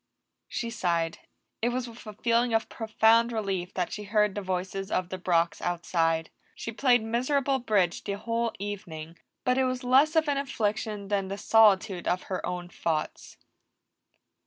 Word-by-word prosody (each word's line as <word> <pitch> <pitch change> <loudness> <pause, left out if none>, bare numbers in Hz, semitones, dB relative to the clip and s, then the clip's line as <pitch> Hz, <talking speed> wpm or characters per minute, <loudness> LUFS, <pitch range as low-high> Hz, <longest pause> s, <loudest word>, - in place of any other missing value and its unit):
She 235 -1 -3
sighed; 170 -5 -1 0.4
it 235 - +2
was 250 0 -2
with 235 0 -12
a 215 - -6
feeling 235 +2 +2
of 225 - 0
profound 225 +1 +3
relief 195 -5 -2
that 180 -2 -1
she 210 - -5
heard 210 -1 +2
the 205 - -3
voices 190 +1 -3
of 180 -3 -1
the 185 - -5
Brocks 170 -2 +1
outside; 165 -2 0 0.2
she 230 - -5
played 245 0 +3
miserable 265 +4 +1
bridge 200 -8 +1
the 200 - -2
whole 230 +3 -1
evening, 175 -5 -6 0.2
but 250 +1 +2
it 260 - +3
was 255 0 -2
less 270 +6 +4
of 320 -1 +3
an 285 -1 +1
affliction 215 -6 -2
than 200 -2 0
the 195 +1 -4
solitude 205 -3 +4
of 180 +1 0
her 185 - -4
own 180 0 -4
thoughts. 165 -3 -3
210 Hz, 165 wpm, -28 LUFS, 185-235 Hz, 0.4 s, less